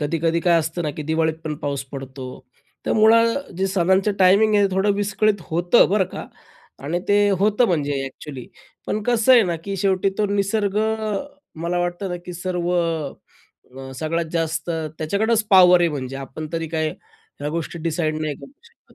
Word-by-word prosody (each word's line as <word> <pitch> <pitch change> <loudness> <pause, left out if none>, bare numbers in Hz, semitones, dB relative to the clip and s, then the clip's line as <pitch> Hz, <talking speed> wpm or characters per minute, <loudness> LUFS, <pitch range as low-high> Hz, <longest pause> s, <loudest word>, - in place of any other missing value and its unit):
कधी-कधी 165 +2 0
काय 170 -1 +4
असतं 160 +2 -4
ना, 150 - -1
की - - -3
दिवाळीत 160 0 +1
पण 155 -1 -3
पाऊस 140 -1 -2
पडतो. 135 -1 -7 0.6
तर - - +1
मुळात 230 +5 +4
जे 190 - +1
सणांचं 190 +3 +2
टायमिंग 200 +4 +5
आहे, 205 -1 +4
थोडं 195 +2 +2
विस्कळीत 205 -1 0
होतं, 175 +7 +4
बरं 200 -1 +3
का, - - -6 0.6
आणि 165 +5 -1
ते 205 - +4 0.2
होतं 210 +4 +3
म्हणजे 150 -7 0
अ‍ॅक्चुअली, 135 -1 -8 0.4
पण 215 - -2
कसं 240 +2 +3
आहे 245 -2 +7
ना, 175 -2 -1
की 195 -1 -4
शेवटी 195 0 +1
तो 210 - +2
निसर्ग 200 0 0
अ, 220 +1 -1 0.3
मला 170 +1 -1
वाटतं 175 +2 -3
ना, 180 - -2
की 180 - -6
सर्व 180 0 -3
अ, 150 -5 -5
सगळ्यात 165 +4 -2
जास्त 165 0 -2 0.3
त्याच्याकडंच 215 +8 +1
पॉवर 180 -2 +7
आहे. 170 - +3
म्हणजे 135 -2 -5
आपण 135 +3 -7
तरी 165 -1 -2
काय 155 -1 +1 0.5
ह्या 145 - -2
गोष्टी 170 +1 -4
डिसाईड 155 -1 -1
नाही 155 -2 -2
करू - - -13
शकत. 465 0 -24
175 Hz, 175 wpm, -22 LUFS, 155-205 Hz, 0.6 s, आहे